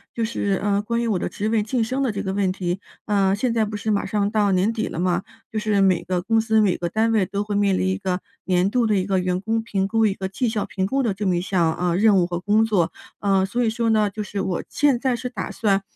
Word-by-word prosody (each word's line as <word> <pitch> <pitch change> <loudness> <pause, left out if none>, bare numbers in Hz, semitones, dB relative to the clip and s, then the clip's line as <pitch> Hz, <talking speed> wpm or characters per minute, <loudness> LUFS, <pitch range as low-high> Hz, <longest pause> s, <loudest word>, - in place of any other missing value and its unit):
就 230 - -1
是 200 -3 -1
呃， 205 0 +1
关 235 +2 -1
于 235 - -1
我 200 -5 0
的 - - -2
职 215 +2 -3
位 225 -1 +2
晋 225 +3 0
升 260 +5 -2
的 265 -4 +1
这 200 0 -4
个 190 - -2
问 195 -2 +1
题。 180 -1 -3 0.3
呃， 195 -2 +2
现 235 +3 0
在 225 -2 +2
不 210 - -5
是 215 +1 -2
马 205 - 0
上 205 +1 0
到 210 -2 +2
年 185 +4 +2
底 225 - -2
了 - - -6
吗？ 180 +1 +1 0.3
就 220 - -1
是 210 -2 +1
每 185 -3 +3
个 180 0 -1
公 225 +4 +2
司、 220 -1 +2
每 195 -4 +2
个 175 - -2
单 220 +4 +1
位 215 -4 +3
都 200 +3 -3
会 205 -1 -3
面 200 -2 +2
临 190 - 0
一 190 - 0
个 185 -2 -2 0.2
年 185 +1 +2
度 245 -1 +2
的 215 - +2
一 185 -2 +1
个 190 -1 +1
员 180 0 -1
工 225 +2 0
评 195 -4 -1
估、 225 +2 +2
一 205 - +2
个 190 -1 -4
绩 195 +6 -1
效 220 -2 -2
评 190 -1 -2
估 270 +5 0
的 220 - 0
这 200 +1 -3
么 180 - +2
一 - - -1
项 175 -4 +1
呃， 175 -1 0
任 205 -1 +5
务 175 - +3
和 175 0 -3
工 210 +4 +3
作。 195 -7 +1 0.3
呃， 195 -2 +2
所 240 +6 -1
以 225 - +2
说 230 +1 0
呢， 215 -2 +3
就 210 +2 -5
是 205 -1 -5
我 190 -2 -2
现 290 -4 +2
在 255 0 +1
是 250 +1 -5
打 245 - -5
算 200 -3 +1
205 Hz, 310 characters per minute, -22 LUFS, 190-220 Hz, 0.3 s, 任